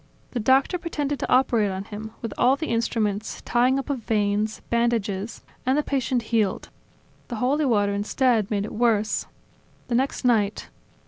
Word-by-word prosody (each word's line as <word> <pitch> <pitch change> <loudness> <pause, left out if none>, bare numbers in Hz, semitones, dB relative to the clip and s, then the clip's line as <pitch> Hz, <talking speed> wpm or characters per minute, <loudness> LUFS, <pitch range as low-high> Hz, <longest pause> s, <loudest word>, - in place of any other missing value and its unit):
The 245 - -2
doctor 265 - +3
pretended 290 -5 -2
to - - -3
operate 240 -5 +3
on 190 0 -4
him, 215 +1 -7
with 230 - -3
all 250 +2 +4
of 280 - -2
the 315 - -3
instruments, 220 -3 -1
tying 250 +2 +3
up 275 - -3
of 280 -3 -2
veins, 210 -1 0
bandages... 230 -3 0 0.2
and 260 +3 +2
the 300 - +2
patient 260 -4 0
healed." 210 -4 +1 0.6
"The 240 - -5
holy 270 +7 +1
water, 205 -5 +2
instead, 220 +1 +1
made 205 -2 0
it - - -7
worse. 220 -2 +1 0.6
The - - -1
next 260 +2 0
night 215 -4 +1
235 Hz, 170 wpm, -24 LUFS, 210-260 Hz, 0.6 s, all